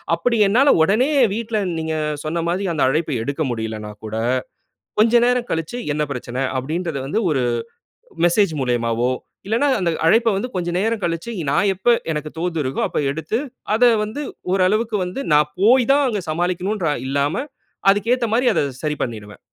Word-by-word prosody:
அப்படி 240 -1 0
என்னால 255 +8 +4
உடனே 220 - +2 0.3
வீட்டில 225 -1 -2 0.2
நீங்க 160 0 -2 0.3
சொன்ன 165 +2 -1
மாதிரி 190 +3 -1
அந்த 155 - +1
அழைப்ப 155 +3 0
எடுக்க 140 +5 -2
முடியலன்னா 110 -2 -4
கூட, 110 0 -5 0.8
கொஞ்சம் 235 +2 +5
நேரம் 250 -1 0
கழிச்சு 165 +8 -3 0.2
என்ன 150 +1 0
பிரச்சனை? 125 0 -5 0.2
அப்படின்றது 155 +3 -3
வந்து 185 +10 0
ஒரு 135 -4 +1 0.8
மெசேஜ் 175 0 +3
மூலயமாவோ 120 -1 0 0.4
இல்லன்னா 230 +7 +2
அந்த 175 -3 +1
அழைப்ப 225 +7 +4
வந்து 240 +6 -2
கொஞ்ச 175 -1 -1
நேரம் 225 +2 0
கழிச்சு, 170 +6 -2 0.2
நான் 205 - +2
எப்போ 195 +6 +2 0.2
எனக்கு 155 0 -3
தோது 165 0 -2
இருக்கோ 130 0 -2
அப்போ - - -2
எடுத்து, 160 +8 -2 0.4
அத 240 +2 +5
வந்து 215 +7 -5 0.3
ஓரளவுக்கு 210 +4 +2
வந்து 180 +10 -5
நான் 150 0 +3
போய் 245 +4 +5
தான் 285 0 +3
அங்க 210 -4 -2
சமாளிக்கணும்ன்னுற 180 +2 -1 0.2
இல்லாம 145 - 0 0.5
அதுக்கு 205 +4 0
ஏத்த 250 -2 -2
மாரி 245 +3 +2
அத - - +2 0.2
சரி 150 -1 -1
பண்ணிடுவேன். 105 -4 -7
175 Hz, 160 wpm, -20 LUFS, 150-225 Hz, 0.8 s, கொஞ்சம்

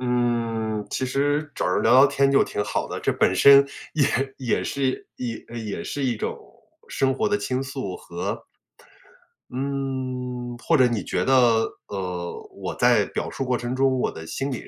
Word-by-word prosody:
嗯， 115 -3 -1
其 130 - -1
实 145 +3 0
找 - - -1
人 90 - +1
聊 - - +4
聊 135 +2 +8
天 140 0 +2
就 135 - +5
挺 105 - -2
好 - - -2
的， - - -4
这 - - +1
本 95 - +2
身 140 +7 +8 0.3
也- 145 -4 +3 0.3
也 125 -3 0
是 135 -2 -2
也 120 -2 -4 0.2
也 110 -3 -5
是 145 - -4
一 120 -3 0
种 - - -3 0.5
生 135 -1 +1
活 215 +10 0
的 205 0 +1
倾 130 -7 -2
诉 130 -9 -5
和 85 0 -5 1.1
嗯 130 -2 -3
或 165 - +2
者 130 - +6
你 115 -6 -2
觉 - - -1
得， 120 -4 +4 0.2
呃， 90 -3 -4 0.2
我 - - -5
在 - - +4
表 - - -4
述 135 - -3
过 125 -1 +1
程 120 +1 -3
中， 130 -1 +2
我 - - 0
的 80 0 -9
心 135 - -3
理 125 - -6
125 Hz, 190 characters per minute, -24 LUFS, 115-135 Hz, 1.1 s, 聊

